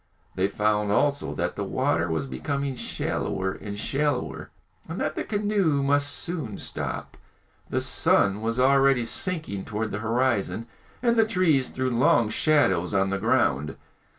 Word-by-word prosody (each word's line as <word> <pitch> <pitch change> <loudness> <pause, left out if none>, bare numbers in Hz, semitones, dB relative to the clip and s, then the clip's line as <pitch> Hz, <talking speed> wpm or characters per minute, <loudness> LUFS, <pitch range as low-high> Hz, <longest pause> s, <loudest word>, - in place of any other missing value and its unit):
They 95 +1 +1
found 105 0 0
also 145 +6 +1
that - - -2
the - - -3
water 80 +1 0
was 80 -3 -1
becoming 140 - -3
shallower 95 -5 -2
and 100 +1 -7
shallower, 140 +4 -2 0.4
and 165 - -5
that - - -1
the - - -3
canoe 205 -9 0
must 145 +1 +2
soon 145 - -1
stop. - - -5 0.5
The - - 0
sun 100 +2 +3
was 115 +2 -1
already 135 -1 +4
sinking 155 - -2
towards 110 0 -3
the 100 - -3
horizon, 115 -1 0 0.4
and 235 -1 +3
the 225 - +5
trees 165 - +2
threw 130 0 -2
long 120 -2 +3
shadows 110 - +2
on 95 0 +2
the 100 - -1
ground. 110 - +1
125 Hz, 150 wpm, -25 LUFS, 100-145 Hz, 0.5 s, the